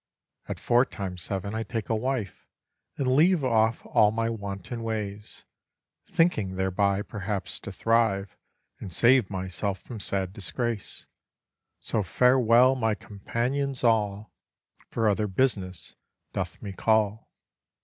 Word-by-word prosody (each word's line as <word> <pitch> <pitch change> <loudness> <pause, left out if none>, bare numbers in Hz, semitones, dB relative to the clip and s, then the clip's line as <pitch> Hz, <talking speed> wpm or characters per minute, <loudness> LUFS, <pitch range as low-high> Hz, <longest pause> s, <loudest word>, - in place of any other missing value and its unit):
At - - -5
four 120 +1 +4
times 95 -7 -6
seven 100 +3 -3
I 110 - -2
take 110 0 -4
a 115 - +1
wife, 115 -4 -3 0.5
And 130 -2 +1
leave 165 +1 +4
off 115 -2 +2
all 105 - +4
my 115 +1 -1
wanton 100 +1 -5
ways, 105 -2 -5 0.6
Thinking 110 - +1
thereby 95 +1 +1
perhaps 100 -2 -4
to 100 - -7
thrive, 100 -1 +1 0.4
And 95 - -7
save 120 +3 +4
myself 95 +1 -3
from 115 -4 -9
sad 95 -2 -1
disgrace. 115 +1 -3 0.7
So 110 - -1
farewell 125 +5 +5
my 110 -5 0
companions 125 +7 -3
all, 105 -3 +1 0.6
For 115 -1 0
other 105 +1 +2
business 95 -5 -1 0.4
doth - - -3
me 100 - -5
call. 110 +1 +1
110 Hz, 125 wpm, -27 LUFS, 100-120 Hz, 0.7 s, farewell